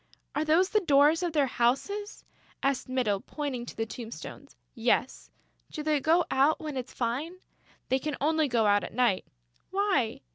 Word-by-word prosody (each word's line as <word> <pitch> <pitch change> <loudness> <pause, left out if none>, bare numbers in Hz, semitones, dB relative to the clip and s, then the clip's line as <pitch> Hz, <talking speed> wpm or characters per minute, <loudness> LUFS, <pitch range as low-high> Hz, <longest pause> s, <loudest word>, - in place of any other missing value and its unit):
"Are 300 - 0
those 330 +5 +3
the 430 - +4
doors 300 -2 +4
of 350 -2 -1
their 295 -3 +3
houses?" 275 - -1 0.4
asked 275 -2 0
Mytyl, 245 -6 0
pointing 270 -5 -5
to - - -9
the 225 - -1
tombstones. 225 +1 -9 0.2
"Yes." 240 +2 0 0.4
"Do 305 - -5
they 305 -1 +2
go 330 +5 +3
out 275 +4 +3
when 300 -2 -5
it's 255 -1 -5
fine?" 260 +9 -2 0.5
"They 260 - +2
can 300 0 -4
only 315 +1 +2
go 235 -4 +2
out 205 0 +3
at - - -7
night." 240 -6 +1 0.4
"Why?" 380 - 0
275 Hz, 170 wpm, -28 LUFS, 245-315 Hz, 0.5 s, the